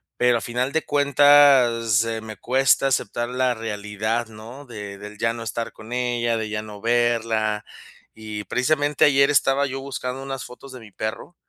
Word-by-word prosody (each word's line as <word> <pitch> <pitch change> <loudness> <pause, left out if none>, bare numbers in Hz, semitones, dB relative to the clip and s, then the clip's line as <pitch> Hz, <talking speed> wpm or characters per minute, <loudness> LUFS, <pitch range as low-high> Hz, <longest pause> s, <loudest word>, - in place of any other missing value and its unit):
pero 125 -1 +3
a - - -5
final 125 +3 -2
de 160 - -1
cuentas, 140 -6 +4
eh, 115 -1 -3
me 110 -1 -9
cuesta 135 +2 +2
aceptar 120 -2 -1
la 125 0 0
realidad, 110 +1 -3
¿no?, 115 +6 -11
de 105 -5 -8
del 105 +1 -10
ya 115 0 0
no 115 0 -7
estar 115 +1 -4
con 110 +2 -13
ella, 120 -1 0
de 110 -1 -4
ya 105 0 -3
no 105 -1 -10
verla. 115 -2 0 0.5
Y 105 -2 -7
precisamente 145 +5 +1
ayer 140 -1 +4
estaba 140 -1 +2
yo 135 +1 -5
buscando 130 -1 -5
unas 135 -1 -5
fotos 130 +2 -12
de 130 - -9
mi 110 -3 -14
perro 110 - -6
120 Hz, 180 wpm, -23 LUFS, 110-135 Hz, 0.5 s, cuentas